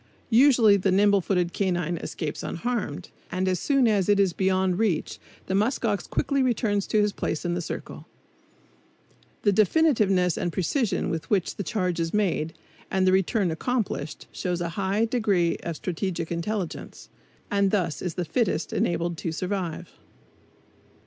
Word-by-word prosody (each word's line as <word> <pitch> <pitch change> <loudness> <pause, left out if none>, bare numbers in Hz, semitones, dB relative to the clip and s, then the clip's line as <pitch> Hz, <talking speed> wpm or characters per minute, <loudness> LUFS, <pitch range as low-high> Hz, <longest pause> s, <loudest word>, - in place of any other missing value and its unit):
Usually 235 -4 +6
the 195 0 0
nimble 200 +1 +4
footed 180 -1 0
canine 175 -3 -1
escapes 155 -1 -5
unharmed, 210 -5 -3 0.2
and 185 +1 -1
as 185 -2 +1
soon 275 -4 +3
as 205 -3 +2
it 205 -1 +4
is 195 -3 +3
beyond 190 0 +1
reach 210 -8 0 0.3
the - - -3
musk 220 +6 +1
ox 205 -4 -1
quickly 280 -1 0
returns 220 -5 +1
to 215 - +2
his 210 0 +2
place 160 - -3
in 175 - 0
the 175 - -2
circle. - - -7 1.4
The 205 - +4
definiteness 205 - +3
and 175 - -1
precision 190 - 0
with 165 -1 -4
which 195 -4 +1
the - - -4
charge 180 -4 -1
is 165 +3 -1
made 165 -6 0 0.3
and 190 -1 +1
the 185 - +4
return 190 0 +2
accomplished 195 - -2
shows 180 -1 -2
a 170 -1 -2
high 195 +4 0
degree 205 -8 +1
of 170 - -5
strategic 175 0 -3
intelligence; 175 +1 -4 0.4
and 200 -1 +3
thus 185 -6 -1
is 180 -3 -3
the 180 - -2
fittest 195 -3 -1
enabled 170 0 0
to 165 - -3
survive. 180 -1 -3
190 Hz, 155 wpm, -26 LUFS, 175-210 Hz, 1.4 s, Usually